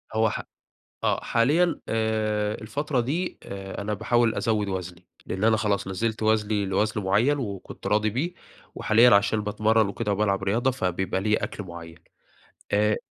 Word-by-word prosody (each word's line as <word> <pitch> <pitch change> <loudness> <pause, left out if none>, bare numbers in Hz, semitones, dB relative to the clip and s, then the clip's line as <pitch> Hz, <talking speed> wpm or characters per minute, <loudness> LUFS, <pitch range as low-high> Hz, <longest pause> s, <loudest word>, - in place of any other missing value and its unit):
هو 110 0 +3
ح - - -3 0.6
آه، - - +2
حاليًا، 155 +8 +2
آآ 110 -1 0
الفترة 140 +4 -2
دي، 155 +10 -2
آآ 95 0 -7
أنا 105 +1 -2
باحاول 115 +2 +2
أزود 105 -1 0
وزني؛ 90 -2 -5 0.2
لأن 95 +3 -3
أنا 110 0 +4
خلاص 105 -3 0
نزلت 110 +3 -2
وزني 105 -2 +1
لوزن 105 +2 0
معيّن 115 +10 +2
وكنت 100 -8 -6
راضي 105 +1 +2
بيه، 155 - -2 0.4
وحاليًا 115 +3 +5
عشان 105 +1 +2
باتمرّن 110 +1 +2
وكده 105 +1 -2
وبالعب 100 -1 +1
رياضة 120 +7 +1
فبيبقى 95 -4 -1
ليا 105 +1 +1
أكل 105 - -4
معيّن. 85 -2 -10 0.7
آآ 105 +1 +3
105 Hz, 150 wpm, -25 LUFS, 100-115 Hz, 0.7 s, وحاليًا